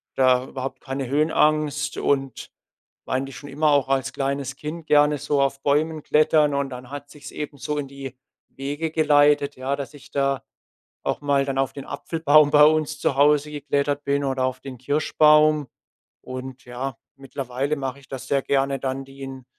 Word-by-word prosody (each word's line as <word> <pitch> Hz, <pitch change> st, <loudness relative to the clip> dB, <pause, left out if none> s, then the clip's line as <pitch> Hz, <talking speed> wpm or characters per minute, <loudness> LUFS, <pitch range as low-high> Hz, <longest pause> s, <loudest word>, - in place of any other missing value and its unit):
da 130 Hz, -1 st, +4 dB
überhaupt 135 Hz, 0 st, -6 dB
keine 135 Hz, -1 st, -4 dB
Höhenangst 150 Hz, 0 st, +1 dB
und 135 Hz, -2 st, -1 dB, 0.5 s
war -, -, -3 dB
eigentlich 135 Hz, 0 st, -4 dB
schon 145 Hz, -1 st, -10 dB
immer 150 Hz, +2 st, +2 dB
auch 140 Hz, -2 st, +2 dB
als 135 Hz, -1 st, 0 dB
kleines 140 Hz, 0 st, -2 dB
Kind 155 Hz, +2 st, -7 dB
gerne 150 Hz, 0 st, +4 dB
so 145 Hz, 0 st, 0 dB
auf 135 Hz, 0 st, 0 dB
Bäumen 155 Hz, +2 st, +1 dB
klettern. 150 Hz, -1 st, +3 dB
Und 140 Hz, -1 st, -1 dB
dann 125 Hz, 0 st, -9 dB
hat 145 Hz, 0 st, -8 dB
sich's 150 Hz, -1 st, -11 dB
eben 145 Hz, -1 st, -6 dB
so 150 Hz, +4 st, -3 dB
in 140 Hz, -, -3 dB
die 135 Hz, -1 st, -9 dB, 0.3 s
Wege 145 Hz, +4 st, -4 dB
geleitet, 145 Hz, -2 st, +3 dB
ja, 135 Hz, +2 st, -2 dB
dass 140 Hz, +1 st, -6 dB
ich 145 Hz, -, -15 dB
da 140 Hz, -1 st, 0 dB, 0.6 s
auch -, -, -2 dB
mal 140 Hz, -1 st, +2 dB
dann 135 Hz, -1 st, -3 dB
auf 135 Hz, -1 st, +1 dB
den 140 Hz, -, -9 dB
Apfelbaum 155 Hz, -2 st, +3 dB
bei 150 Hz, 0 st, +7 dB
uns 155 Hz, -1 st, +1 dB
zu 135 Hz, -, 0 dB
Hause 150 Hz, +1 st, +4 dB
geklettert 145 Hz, 0 st, -1 dB
bin 140 Hz, 0 st, 0 dB
oder 130 Hz, -1 st, -1 dB
auf 130 Hz, 0 st, -1 dB
den 130 Hz, -2 st, -9 dB
Kirschbaum. 150 Hz, +2 st, +3 dB, 0.5 s
Und 130 Hz, 0 st, -8 dB
ja, 125 Hz, +1 st, -5 dB, 0.2 s
mittlerweile 135 Hz, +1 st, -3 dB
mache 135 Hz, 0 st, -4 dB
ich 135 Hz, -, -19 dB
das 135 Hz, -2 st, -7 dB
sehr 140 Hz, -1 st, +1 dB
gerne 135 Hz, 0 st, 0 dB
dann 135 Hz, 0 st, -3 dB
die 135 Hz, 0 st, -14 dB
in 130 Hz, -2 st, -8 dB
140 Hz, 180 wpm, -23 LUFS, 135-150 Hz, 0.6 s, bei